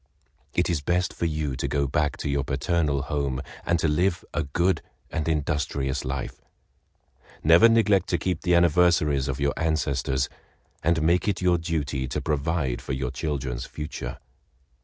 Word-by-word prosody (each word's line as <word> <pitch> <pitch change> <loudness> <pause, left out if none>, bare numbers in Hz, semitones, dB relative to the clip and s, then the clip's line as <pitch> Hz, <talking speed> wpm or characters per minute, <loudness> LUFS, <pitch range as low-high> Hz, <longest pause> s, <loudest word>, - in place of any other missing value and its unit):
It - - +2
is 85 -4 0
best 90 +5 0
for - - -2
you 75 -4 -2
to - - -2
go 70 -1 0
back 75 +2 0
to - - -4
your 70 -1 0
paternal 70 +1 0
home, 70 -3 -2 0.3
and 85 - +3
to 80 - +1
live 85 +4 +1
a - - 0
good 85 +7 +1 0.3
and 80 -1 -2
industrious 75 -3 -1
life. 65 0 -4 1.0
Never 85 +9 +7
neglect 105 -5 +3
to 85 - +2
keep 90 -2 -2
the 90 -1 +3
anniversaries 85 -5 +3
of 70 -1 -3
your 70 0 +1
ancestors, 70 -4 0 0.5
and 80 -1 +2
make 85 +5 +2
it 100 -3 +1
your 90 -2 +3
duty 75 -6 -2
to - - -2
provide 75 -3 -1
for - - -4
your 65 -1 -2
children's 65 -4 -3
future. 75 -5 -6
75 Hz, 160 wpm, -26 LUFS, 70-85 Hz, 1.0 s, Never